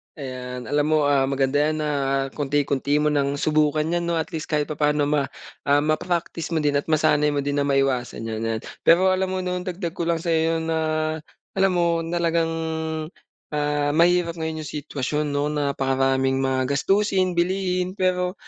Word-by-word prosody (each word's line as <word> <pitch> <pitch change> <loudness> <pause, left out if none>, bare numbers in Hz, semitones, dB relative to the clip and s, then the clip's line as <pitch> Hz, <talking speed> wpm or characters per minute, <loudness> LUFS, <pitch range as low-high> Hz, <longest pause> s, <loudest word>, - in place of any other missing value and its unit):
Ayan. 125 -2 -6
Alam 145 0 +2
mo, 155 0 +3
ah, 140 -2 +3
maganda 135 0 +1
'yan 155 +1 +2
na 150 - -1 0.4
kaunti-kaunti 145 0 0
mo 150 - +3
nang 140 -1 +1
subukan 150 +1 +2
'yan 175 0 -1
'no. 170 - 0
At 160 -1 -2
least 155 -1 -5
kahit 150 -1 +1
papaano 150 0 +1
ma 145 -1 +1 0.4
ah, 145 +1 +4
ma-practice 165 +1 -1
mo 160 - +1
din 145 -1 +2
at - - -8
masanay 155 -1 +3
mo 140 -1 -1
din 145 +1 -1
na 140 - +1
maiwasan 135 -4 0
'yan, 110 -1 -4
'yan. 115 -1 -1 0.3
Pero 185 +3 +6
alam 190 0 +1
mo 185 0 -2
'no, 180 0 -2
dagdag 180 -1 -4
ko 170 -2 -3
lang 170 -1 +2
sa'yo 165 -1 +1
na 160 0 -1 0.8
alam 195 0 +4
mo, 170 -1 +1
talagang, 170 -1 +1 1.0
ah, 145 -1 0
mahirap 170 +1 +3
ngayon 160 -1 -3
'yong - - -7
sitwasyon 150 +1 -2
'no, 145 +1 -1
napakaraming 135 -2 +1
mag 130 -1 +1
gastusin, 190 +5 +1
bilihin, 180 0 0
pero, 180 -2 0
150 Hz, 170 wpm, -23 LUFS, 140-170 Hz, 1.0 s, Pero